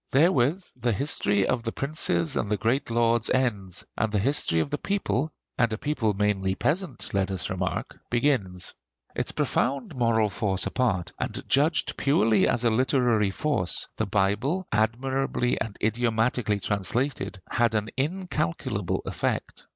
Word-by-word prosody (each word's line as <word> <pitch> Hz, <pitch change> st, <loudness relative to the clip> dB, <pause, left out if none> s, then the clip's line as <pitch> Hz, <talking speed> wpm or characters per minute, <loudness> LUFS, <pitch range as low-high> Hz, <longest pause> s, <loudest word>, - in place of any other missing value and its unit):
Therewith 160 Hz, +3 st, +3 dB
the 120 Hz, -2 st, 0 dB
history 105 Hz, -6 st, +1 dB
of 125 Hz, -2 st, 0 dB
the 115 Hz, 0 st, -3 dB
princes 135 Hz, -, +1 dB
and 100 Hz, -, -1 dB
the 105 Hz, -, +1 dB
great 120 Hz, +7 st, 0 dB
lords 115 Hz, -1 st, +2 dB
ends, 105 Hz, -8 st, 0 dB
and 110 Hz, -, 0 dB
the 105 Hz, -, +1 dB
history 105 Hz, -, +2 dB
of 140 Hz, -, -1 dB
the 145 Hz, -, -1 dB
people 160 Hz, -7 st, -1 dB, 0.3 s
and 115 Hz, -2 st, +3 dB
a 110 Hz, -, -2 dB
people 120 Hz, -7 st, 0 dB
mainly 95 Hz, -2 st, +1 dB
peasant, 155 Hz, -, -2 dB
let 100 Hz, -1 st, +1 dB
us 95 Hz, -1 st, -2 dB
remark 95 Hz, 0 st, -3 dB
begins. 120 Hz, -8 st, 0 dB, 0.4 s
Its -, -, 0 dB
profound 155 Hz, -, -1 dB
moral 115 Hz, -4 st, +2 dB
force 95 Hz, -3 st, 0 dB
apart, 105 Hz, -9 st, 0 dB
and -, -, -4 dB
judged 150 Hz, +4 st, +2 dB
purely 115 Hz, -6 st, +3 dB
as 120 Hz, 0 st, +1 dB
a 115 Hz, -, +4 dB
literary 120 Hz, -3 st, +2 dB
force, 95 Hz, -, -1 dB
the 110 Hz, -, -1 dB
Bible, 105 Hz, -, 0 dB
admirably 125 Hz, +3 st, 0 dB
and 110 Hz, -2 st, -4 dB
idiomatically 115 Hz, -1 st, +1 dB
translated, 105 Hz, +4 st, -1 dB
had 120 Hz, -2 st, +1 dB
an 105 Hz, 0 st, 0 dB
incalculable 155 Hz, -, -2 dB
effect. -, -, -3 dB
115 Hz, 145 wpm, -26 LUFS, 105-135 Hz, 0.4 s, a